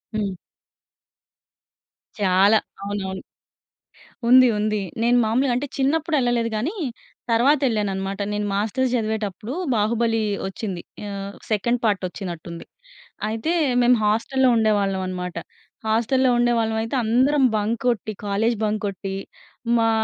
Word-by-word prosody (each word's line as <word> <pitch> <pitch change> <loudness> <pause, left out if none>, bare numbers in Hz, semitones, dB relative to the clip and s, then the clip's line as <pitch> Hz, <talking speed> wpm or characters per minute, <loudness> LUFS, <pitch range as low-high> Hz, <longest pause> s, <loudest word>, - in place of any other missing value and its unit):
హ్మ్. 205 -3 -1 1.8
చాలా, 200 +1 +4 0.2
అవునవును. 200 -1 -4 1.1
ఉంది. 255 +1 +8
ఉంది. 215 0 0 0.2
నేను 240 +1 +4
మామూలుగా 245 +4 +1
అంటే 285 +3 -2
చిన్నప్పుడు 310 +4 +1
ఎళ్ళలేదు 240 -2 +1
గానీ 295 - -2 0.6
తర్వాత 265 +6 +4
ఎళ్ళానన్నమాట. 195 -3 -2
నేను 210 0 -1
మాస్టర్స్ 225 +6 0
చదివేటప్పుడు 215 -1 -3 0.2
'బాహుబలి' 225 +1 +1 0.2
ఓచ్చింది. 190 -2 -5 0.3
ఆ! - - -5 0.4
సెకండ్ 235 +3 +1
పార్టోచ్చినట్టుంది. 180 -4 -3 0.6
అయితే 225 +9 -2 0.3
మేము 245 0 +5
హాస్టల్‌లో 250 +5 +2
ఉండేవాళ్ళం 205 -3 +1
అన్నమాట. 180 -1 -5 0.5
హాస్టల్‌లో 245 +4 +2
ఉండేవాళ్ళమైతే 225 0 +1
అందరం 260 +5 +3
బంక్ 215 +2 0
కొట్టి 220 -2 0
కాలేజ్ 220 +4 +1
బంక్ 215 0 0
కొట్టి, 195 0 -5 0.6
మా 225 0 +3
220 Hz, 105 wpm, -23 LUFS, 200-240 Hz, 1.8 s, ఉంది